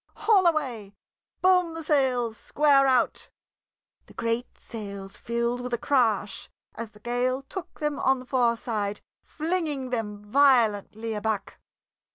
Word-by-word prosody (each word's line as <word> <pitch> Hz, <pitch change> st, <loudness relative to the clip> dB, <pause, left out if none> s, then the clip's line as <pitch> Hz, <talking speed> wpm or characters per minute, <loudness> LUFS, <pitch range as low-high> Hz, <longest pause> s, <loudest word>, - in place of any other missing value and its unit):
"Haul 415 Hz, -4 st, +4 dB
away! 245 Hz, -11 st, -1 dB, 0.5 s
Boom 360 Hz, -3 st, +4 dB
the 325 Hz, -, -5 dB
sails 255 Hz, -6 st, +1 dB
square 280 Hz, +2 st, +3 dB
out!" 255 Hz, -2 st, +1 dB, 0.8 s
The -, -, -17 dB
great 230 Hz, +1 st, -2 dB
sails 200 Hz, -4 st, -7 dB
filled 235 Hz, +1 st, -2 dB
with 245 Hz, -1 st, -2 dB
a -, -, -4 dB
crash 225 Hz, -7 st, +1 dB, 0.2 s
as 230 Hz, -1 st, -6 dB
the 210 Hz, -, -19 dB
gale 245 Hz, +3 st, -1 dB
took 365 Hz, +6 st, -8 dB
them 300 Hz, -2 st, -1 dB
on 265 Hz, 0 st, +3 dB
the 255 Hz, -, -10 dB
fore 240 Hz, -2 st, +2 dB
side, 210 Hz, -3 st, -3 dB, 0.2 s
flinging 310 Hz, -5 st, -2 dB
them 220 Hz, -4 st, -2 dB
violently 225 Hz, -3 st, +3 dB
aback. 215 Hz, -1 st, -3 dB
245 Hz, 135 wpm, -26 LUFS, 220-285 Hz, 0.8 s, Haul